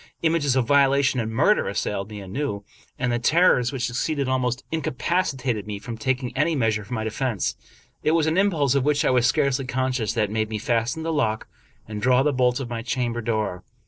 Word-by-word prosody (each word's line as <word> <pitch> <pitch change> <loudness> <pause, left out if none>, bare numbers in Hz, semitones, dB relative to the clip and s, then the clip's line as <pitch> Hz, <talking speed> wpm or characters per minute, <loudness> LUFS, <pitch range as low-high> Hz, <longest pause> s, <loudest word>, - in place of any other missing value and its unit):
Images 160 -5 +2
of 130 -2 +2
violation 140 0 +3
and 110 -1 -2
murder 195 - +3
assailed 100 0 -2
me 105 -1 -7
anew, 100 +1 -4 0.3
and 125 -1 -1
the 120 - 0
terrors 125 -3 +3
which 130 -3 -2
succeeded 140 +3 -1
almost 130 -1 -1
incapacitated 130 - -1
me 105 -1 -4
from 115 +3 -7
taking 125 +2 -2
any 155 +4 +1
measures 110 -5 0
for 125 - -4
my 110 - -2
defense. 110 -1 -2 0.5
It 155 - +2
was 165 -2 +3
an 160 +1 +1
impulse 165 -9 +2
of 140 -2 +2
which 145 0 +2
I - - +3
was 125 -1 +3
scarcely 135 +1 +1
conscious 130 -5 -1
that 105 -3 0
made 110 0 -1
me 110 - -3
fasten 120 +7 -1
the 165 0 -1
lock 110 -7 0 0.4
and 105 -1 -6
draw 125 +2 +4
the 150 0 +1
bolts 125 -1 +2
of 135 - -4
my 120 -1 -4
cham 120 0 -1
ber 120 - -3
door. 110 -5 -2
125 Hz, 210 wpm, -24 LUFS, 110-140 Hz, 0.5 s, draw